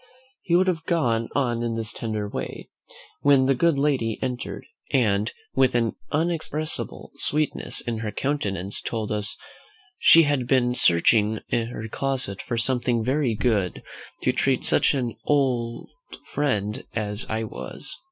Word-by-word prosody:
He 170 Hz, -, +1 dB
would 185 Hz, +2 st, +5 dB
have 165 Hz, -3 st, -1 dB
gone 120 Hz, -9 st, +1 dB
on 120 Hz, -4 st, +1 dB
in 115 Hz, -1 st, -1 dB
this 110 Hz, -1 st, 0 dB
tender 110 Hz, -2 st, -3 dB
way, -, -, -6 dB, 0.5 s
when 140 Hz, -2 st, +5 dB
the 135 Hz, -, +4 dB
good 160 Hz, +3 st, +2 dB
lady 135 Hz, -6 st, +1 dB
entered, 125 Hz, -2 st, -4 dB, 0.3 s
and, 110 Hz, -5 st, +2 dB, 0.2 s
with 130 Hz, -2 st, +3 dB
an 115 Hz, -2 st, +1 dB, 0.2 s
inexpressible 155 Hz, -1 st, -1 dB
sweetness 150 Hz, 0 st, +1 dB
in 115 Hz, -3 st, -3 dB
her 110 Hz, -1 st, -3 dB
countenance, 100 Hz, -10 st, -2 dB
told 110 Hz, -2 st, -3 dB
us 105 Hz, -1 st, -1 dB, 0.6 s
"she 165 Hz, -, +8 dB
had 145 Hz, -4 st, 0 dB
been 125 Hz, -2 st, +3 dB
searching 105 Hz, +2 st, +3 dB
her 115 Hz, -1 st, -2 dB
closet 125 Hz, -6 st, -2 dB
for 120 Hz, +5 st, -3 dB
something 120 Hz, -1 st, +1 dB
very 130 Hz, -1 st, +1 dB
good, 105 Hz, -6 st, 0 dB, 0.4 s
to -, -, +3 dB
treat -, -, +1 dB
such -, -, +3 dB
an 120 Hz, -4 st, -2 dB
old 125 Hz, -5 st, 0 dB, 0.4 s
friend 105 Hz, -8 st, -1 dB
as 105 Hz, 0 st, -3 dB
I 110 Hz, 0 st, -1 dB
was." 110 Hz, -, -8 dB
120 Hz, 140 wpm, -24 LUFS, 110-140 Hz, 0.6 s, she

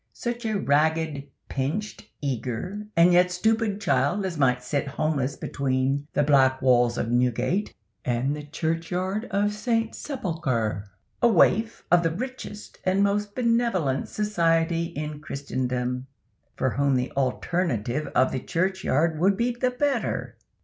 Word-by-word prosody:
Such 240 Hz, -1 st, -4 dB
a 215 Hz, -2 st, 0 dB
ragged, 155 Hz, -2 st, +1 dB, 0.2 s
pinched, 190 Hz, +11 st, -3 dB
eager, 140 Hz, -, -3 dB
and 175 Hz, +1 st, +6 dB
yet 180 Hz, +1 st, +5 dB
stupid 215 Hz, +3 st, +1 dB
child 145 Hz, +2 st, +1 dB
as 185 Hz, -3 st, -3 dB
might 125 Hz, -4 st, +2 dB
sit 140 Hz, +2 st, -1 dB
homeless 140 Hz, -1 st, -1 dB
between 135 Hz, +1 st, -1 dB
the 145 Hz, -, +2 dB
black 135 Hz, -2 st, +4 dB
walls 120 Hz, -2 st, +3 dB
of 115 Hz, -, -1 dB
Newgate 125 Hz, -, +1 dB, 0.3 s
and 125 Hz, +4 st, 0 dB
the 150 Hz, -, -6 dB
churchyard 165 Hz, +7 st, -2 dB
of 205 Hz, +1 st, +1 dB
St. 225 Hz, +1 st, 0 dB
Sepulchre,—a 130 Hz, -, -2 dB
waif 225 Hz, +2 st, +3 dB
of 175 Hz, 0 st, +6 dB
the 165 Hz, -, +1 dB
richest 255 Hz, -2 st, -7 dB
and 190 Hz, +2 st, +2 dB
most 205 Hz, 0 st, 0 dB
benevolent 230 Hz, -, +1 dB
society 170 Hz, -5 st, +1 dB
in 150 Hz, -3 st, -5 dB
Christendom, 125 Hz, -3 st, -3 dB, 0.5 s
for 130 Hz, -, 0 dB
whom 140 Hz, 0 st, +2 dB
the 125 Hz, +1 st, -1 dB
alternative 135 Hz, -, -1 dB
of 130 Hz, +1 st, +4 dB
the 130 Hz, -, -2 dB
churchyard 165 Hz, -2 st, 0 dB
would 190 Hz, +3 st, +3 dB
be 240 Hz, +2 st, +1 dB
the 245 Hz, +1 st, 0 dB
better." 250 Hz, -1 st, -1 dB
160 Hz, 135 wpm, -25 LUFS, 130-205 Hz, 0.5 s, and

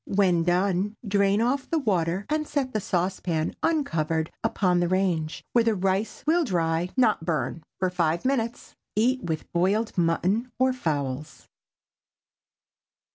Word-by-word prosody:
When 190 Hz, -4 st, +3 dB
done, 185 Hz, +4 st, +1 dB
drain 200 Hz, +1 st, +3 dB
off 260 Hz, +3 st, 0 dB
the 330 Hz, -, +1 dB
water, 190 Hz, -, 0 dB
and 305 Hz, 0 st, -1 dB
set 270 Hz, -3 st, -2 dB
the 215 Hz, -, +1 dB
saucepan 180 Hz, -4 st, -1 dB
uncovered 165 Hz, -, 0 dB
upon 180 Hz, -3 st, +2 dB
the 175 Hz, -, +1 dB
range, 175 Hz, -4 st, 0 dB
where 235 Hz, -, +5 dB
the 225 Hz, -1 st, +2 dB
rice 195 Hz, +3 st, -1 dB
will 335 Hz, +3 st, +3 dB
dry, 170 Hz, -, 0 dB
not 220 Hz, -9 st, +3 dB
burn, 165 Hz, -1 st, -2 dB, 0.2 s
for 185 Hz, -1 st, 0 dB
five 170 Hz, 0 st, 0 dB
minutes. 240 Hz, -3 st, -2 dB, 0.2 s
Eat 250 Hz, +4 st, +2 dB
with 160 Hz, -3 st, -4 dB
boiled 195 Hz, +6 st, +1 dB
mutton 185 Hz, +8 st, +1 dB
or 260 Hz, 0 st, +3 dB
fowls. 150 Hz, -, -3 dB
190 Hz, 135 wpm, -26 LUFS, 170-230 Hz, 0.2 s, where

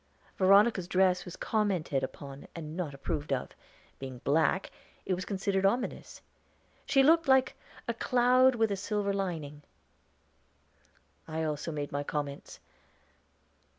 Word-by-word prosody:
Veronica's 195 Hz, 0 st, +4 dB
dress 185 Hz, -1 st, +2 dB
was 180 Hz, -, -8 dB
commented 190 Hz, -10 st, 0 dB
upon 140 Hz, +1 st, -7 dB
and 160 Hz, -2 st, -7 dB
not 175 Hz, -5 st, -3 dB
approved 145 Hz, +1 st, -4 dB
of; 135 Hz, -, -1 dB, 0.5 s
being 130 Hz, -2 st, -7 dB
black, 160 Hz, +6 st, +1 dB, 0.3 s
it 190 Hz, -, 0 dB
was 185 Hz, +1 st, -3 dB
considered 195 Hz, -1 st, -1 dB
ominous. 235 Hz, +6 st, -1 dB, 0.6 s
She 270 Hz, -2 st, +4 dB
looked 330 Hz, +2 st, +4 dB
like 265 Hz, -1 st, +4 dB, 0.3 s
a 235 Hz, -, 0 dB
'cloud 250 Hz, +2 st, +4 dB
with 225 Hz, -2 st, +1 dB
a -, -, +1 dB
silver 200 Hz, +1 st, -1 dB
lining.' 160 Hz, -7 st, -4 dB, 1.7 s
I 160 Hz, 0 st, -3 dB
also 155 Hz, +1 st, -3 dB
made 145 Hz, -2 st, -4 dB
my 145 Hz, -, -2 dB
comments. 145 Hz, -1 st, -5 dB
185 Hz, 125 wpm, -30 LUFS, 150-210 Hz, 1.7 s, Veronica's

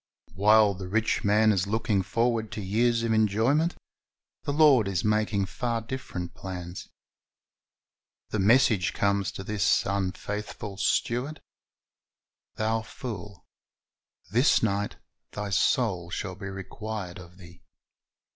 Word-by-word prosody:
"^ -, -, -19 dB
While 105 Hz, +1 st, +5 dB
the 95 Hz, -1 st, -7 dB
rich 110 Hz, +4 st, 0 dB
man 105 Hz, +2 st, +4 dB
is 95 Hz, -1 st, 0 dB
looking 110 Hz, -1 st, +1 dB
forward 115 Hz, +2 st, 0 dB
to 105 Hz, -, -4 dB
years 115 Hz, +4 st, +1 dB
of 115 Hz, -1 st, +1 dB
enjoyment, 115 Hz, -, +2 dB, 0.7 s
the -, -, 0 dB
Lord 140 Hz, -7 st, +5 dB
is 95 Hz, -4 st, -1 dB
making 105 Hz, -2 st, +1 dB
far 115 Hz, +5 st, -2 dB
different 110 Hz, -7 st, -6 dB
plans. 90 Hz, -1 st, -7 dB, 1.4 s
The 110 Hz, -, -2 dB
message 110 Hz, -2 st, +4 dB
comes 100 Hz, -1 st, +1 dB
to 95 Hz, -, -6 dB
this 105 Hz, 0 st, +1 dB
unfaithful 100 Hz, +1 st, -4 dB
steward, 125 Hz, +8 st, 0 dB, 1.2 s
"Thou 110 Hz, +1 st, 0 dB
fool, 105 Hz, -4 st, -8 dB, 0.9 s
this 125 Hz, +5 st, +4 dB
night 100 Hz, -1 st, 0 dB, 0.4 s
thy 105 Hz, -1 st, -4 dB
soul 100 Hz, -4 st, +1 dB
shall 95 Hz, +2 st, -4 dB
be 100 Hz, +2 st, -8 dB
required 95 Hz, -1 st, -6 dB
of 90 Hz, 0 st, -13 dB
thee." 85 Hz, -2 st, -15 dB
105 Hz, 120 wpm, -27 LUFS, 95-115 Hz, 1.4 s, While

